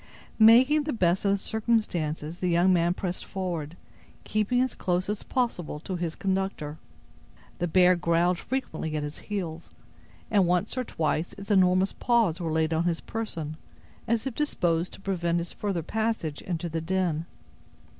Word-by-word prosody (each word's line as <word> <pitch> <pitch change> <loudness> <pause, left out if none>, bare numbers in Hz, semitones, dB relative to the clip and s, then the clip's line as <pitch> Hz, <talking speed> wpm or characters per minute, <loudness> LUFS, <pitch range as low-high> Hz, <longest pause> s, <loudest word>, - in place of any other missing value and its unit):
Making 255 +7 +7
the 300 - -1
best 185 -3 +1
of 200 - +4
the - - +2
circumstances, 180 -8 -1
the 180 - 0
young 175 +2 +4
man 175 0 +2
pressed 180 -2 -3
forward, 175 -4 -4 0.5
keeping 215 +3 +1
as 255 0 +1
close 180 0 -1
as 210 0 -2
possible 180 - -2
to 185 - -4
his 170 -2 -3
conductor. 190 -6 -2 0.8
The 175 - 0
bear 180 +1 +5
growled 170 +1 +2
frequently 255 -12 -3
at 150 - -2
his 150 0 -6
heels, 170 -6 -5 0.6
and 200 -4 +4
once 180 +6 +1
or 255 - -1
twice 160 -5 -1
its 200 +1 -7
enormous 185 0 +4
paws 230 -9 +2
were 165 -2 -2
laid 160 0 +1
on 160 +1 +1
his 170 -2 +1
person, 165 -9 -5 0.5
as 230 +1 +1
if 265 - -2
disposed 175 - 0
to - - -11
prevent 175 -3 0
his 170 0 -3
further 195 -5 -2
passage 220 -7 -2
into 175 -1 -3
the 165 0 -3
den. 170 -2 -1
180 Hz, 165 wpm, -27 LUFS, 165-210 Hz, 0.8 s, Making